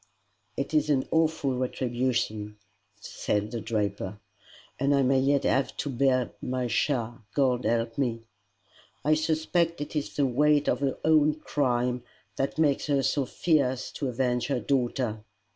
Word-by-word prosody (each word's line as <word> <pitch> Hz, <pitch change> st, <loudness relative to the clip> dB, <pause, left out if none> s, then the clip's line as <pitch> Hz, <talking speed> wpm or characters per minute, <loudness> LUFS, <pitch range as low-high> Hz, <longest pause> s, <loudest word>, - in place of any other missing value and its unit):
"It 140 Hz, +3 st, -3 dB
is 155 Hz, -1 st, +2 dB
an 135 Hz, -3 st, +2 dB
awful 160 Hz, -4 st, +1 dB
retribution," 120 Hz, -4 st, -1 dB, 0.4 s
said 105 Hz, 0 st, -2 dB
the 115 Hz, -, -4 dB
draper, 105 Hz, -3 st, -2 dB, 0.6 s
"and 140 Hz, +2 st, +3 dB
I 140 Hz, -, +3 dB
may 130 Hz, +1 st, +3 dB
yet 140 Hz, +1 st, +2 dB
have 135 Hz, -, +1 dB
to 145 Hz, -, -2 dB
bear 130 Hz, -1 st, +2 dB
my 125 Hz, 0 st, -2 dB
share 120 Hz, -1 st, 0 dB, 0.2 s
God 125 Hz, -3 st, +2 dB
help 115 Hz, +1 st, 0 dB
me!" 115 Hz, -4 st, -1 dB, 0.8 s
"I 155 Hz, -, +4 dB
suspect 160 Hz, +2 st, +1 dB
it 145 Hz, +2 st, -6 dB
is 150 Hz, -, -3 dB
the 145 Hz, -, +2 dB
weight 145 Hz, +3 st, +3 dB
of -, -, +2 dB
her 140 Hz, -2 st, -1 dB
own 155 Hz, -1 st, +4 dB
crime 125 Hz, -5 st, 0 dB, 0.4 s
that 135 Hz, -, -1 dB
makes 150 Hz, -3 st, +2 dB
her 140 Hz, -2 st, +2 dB
so 135 Hz, +1 st, +1 dB
fierce 135 Hz, -6 st, +1 dB
to 140 Hz, -, -3 dB
avenge 125 Hz, 0 st, 0 dB
her 135 Hz, -3 st, 0 dB
daughter. 120 Hz, -4 st, -1 dB
130 Hz, 150 wpm, -27 LUFS, 120-145 Hz, 0.8 s, I